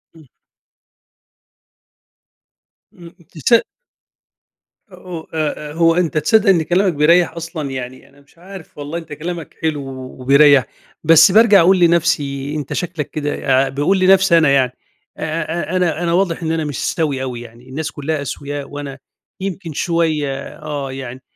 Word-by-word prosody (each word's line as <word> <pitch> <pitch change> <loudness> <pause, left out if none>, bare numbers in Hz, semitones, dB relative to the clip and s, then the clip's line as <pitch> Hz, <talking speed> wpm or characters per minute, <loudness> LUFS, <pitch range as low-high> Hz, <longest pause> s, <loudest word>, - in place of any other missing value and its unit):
إمم. 160 -2 -17 2.7
إمم 170 -1 -12 0.3
تصد 225 - +3 1.3
أو 180 -3 -9
آآ، 150 -1 -3
آآ، 150 - -9
هو 165 0 +3
أنتَ 170 -3 0
تصدَّق 200 +7 +3
إن 175 -4 +4
كلامَك 180 +2 +1
بيريح 165 +3 +3
أصلًا 165 -4 -5
يعني، 130 -1 -7
أنا 140 +1 -22
مش 140 +4 -27
عارِف، 185 -2 -12
والله 145 +3 -5
أنتَ 160 -3 -8
كلامَك 165 +2 -6
حلو 155 -3 -1
و 130 -1 -9
وبيريح. 140 0 +5 0.4
بس 165 +3 +7
بارجع 215 -1 +6
أقول 185 +2 +4
لنفسي: 150 -4 +1
"أنتَ 145 -3 -4
شكلَك 170 -5 -4
كده" 135 -3 0
باقول 145 +8 +1
لي 185 - +2
نفسي 190 -2 +5
أنا 160 -4 +4
يعني: 130 -3 +3 0.5
"أ - - -11
أ 165 +2 -3
أنا 175 -2 0
أنا 170 -1 0
واضِح 175 -2 0
إن 160 - -1
أنا 160 -1 -1
مش 145 -4 -3
سوِيّ 145 -5 -1
أوي 125 -2 -5
يعني، 120 +2 -14
الناس 155 +4 -4
كلها 145 +1 -3
أسوياء 140 +1 -6
وأنا 145 -1 -7 0.4
يمكن 185 -4 -5
شوية 155 -5 -1
آه 145 -3 -5
يعني، 130 -1 -8
155 Hz, 150 wpm, -18 LUFS, 140-170 Hz, 2.7 s, بس